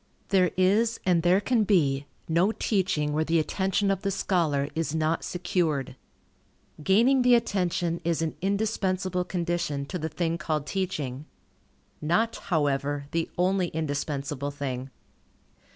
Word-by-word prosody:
There 185 -2 +4
is, 215 +5 +3
and 175 -3 +3
there 175 +3 +4
can 225 +1 +2
be, 145 -9 +2 0.2
no 170 +6 +3
teaching, 185 -10 0
where 155 +1 +1
the 165 +1 +1
attention 190 +5 +1
of 195 - -1
the 200 - -1
scholar 165 -8 0
is 160 -1 -2
not 160 +1 0
secured. 175 -6 -1 0.9
Gaining 235 - +4
the 245 0 +6
attention 175 -6 0
is 165 -1 0
an 160 - -2
indispensable 190 -2 0
condition 170 -6 -2
to 180 +5 -5
the 160 +1 -3
thing 165 +2 -2
called 155 -2 -2
teaching. 150 -8 -3 0.8
Not, 215 +9 +1
however, 145 -3 -1
the 165 0 -1
only 185 0 +2
indispensable 145 -2 -3
thing. 135 -2 -4
170 Hz, 135 wpm, -27 LUFS, 150-190 Hz, 0.9 s, the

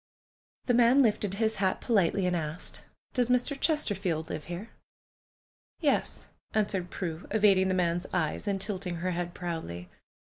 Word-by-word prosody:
'' - - -53
The 245 - +2
man 245 +3 +6
lifted 205 -4 +1
his 220 +1 0
hat 190 -1 +1
politely, 195 -4 +2
and 180 0 +1
asked: 160 0 -5 0.3
"Does 250 -2 +2
Mr. 250 +3 +2
Chesterfield 195 - 0
live 155 - -5
here?" 175 +6 -6 1.1
"Yes," - - 0 0.3
answered 200 -4 0
Prue, 170 -2 -5
evading 200 -3 +4
the 185 - +1
man's 175 0 0
eyes 175 +2 -1
and 200 -1 0
tilting 190 -3 -3
her 180 +2 -1
head 175 0 -3
proudly. 160 - -5
190 Hz, 150 wpm, -29 LUFS, 175-215 Hz, 1.1 s, man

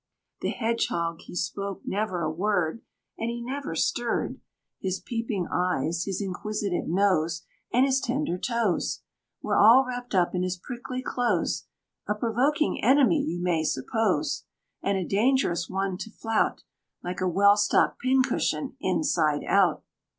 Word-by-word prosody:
The - - 0
Hedgehog 170 -8 -1
he - - -11
spoke 195 +3 -3
never 190 -4 -1
a 155 - 0
word, 180 +2 0 0.4
And 225 - -1
he 235 0 -4
never 255 -6 -4
stirred; 235 +8 -1 0.4
His 190 -1 -2
peeping 220 -2 -3
eyes, 170 -2 0
his 195 +1 -2
inquisitive 200 0 -2
nose, 170 -3 +1 0.3
And 255 +2 +4
his 270 0 +2
tender 245 - -1
toes, 235 -6 0 0.4
Were - - 0
all 235 +6 +8
wrapped 245 -3 -5
up 180 -2 +3
in 180 - 0
his 185 0 -1
prickly 250 +5 -6
clothes. 235 -11 0 0.4
A 210 - 0
provoking 255 +8 +1
enemy 280 +5 +5
you 175 -9 -3
may 170 -3 +1
suppose! 160 - 0 0.4
And 200 0 0
a 185 - -2
dangerous 205 -5 +1
one 190 -1 -2
to 220 - -6
flout 225 0 -1 0.4
Like 180 +1 -4
a 185 - +2
well 200 +3 +5
stocked 205 0 +2
pin 260 +1 +3
cushion - - -1
inside - - +1
out. - - +3
200 Hz, 145 wpm, -27 LUFS, 180-240 Hz, 0.4 s, all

